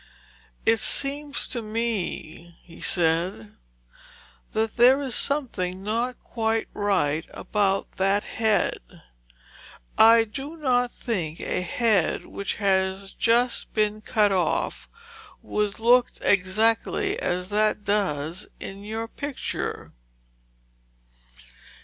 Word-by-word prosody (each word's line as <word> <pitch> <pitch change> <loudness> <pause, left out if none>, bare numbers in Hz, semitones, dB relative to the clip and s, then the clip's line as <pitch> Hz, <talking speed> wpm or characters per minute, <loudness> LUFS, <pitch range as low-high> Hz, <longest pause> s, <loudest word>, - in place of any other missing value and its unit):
'It 225 0 +4
seems 285 +4 0
to 240 - -3
me,' 210 -7 -4
he 170 - -14
said, 165 - 0 1.0
'that 220 0 -1
there 250 +3 +6
is 270 -4 -4
something 195 -10 -2
not 235 +4 -1
quite 225 -1 -1
right 175 -7 0
about 195 -2 0
that 195 +2 +2
head. 220 -2 0 1.2
I 225 +1 +8
do 270 +9 -7
not 245 -5 +1
think 175 -12 -4
a - - -2
head 205 -1 +1
which 200 - -4
had 195 -1 0
just 235 +2 +2
been 215 -1 +1
cut 210 -1 +2
off 185 -2 -1 0.5
would 210 -1 -1
look 240 +2 +4
exactly 220 - +2
as 180 - -2
that 210 0 +1
does 175 -5 -1
in 195 +1 -8
your 220 +2 -4
picture.' 285 +3 -5
210 Hz, 100 wpm, -25 LUFS, 190-235 Hz, 1.2 s, I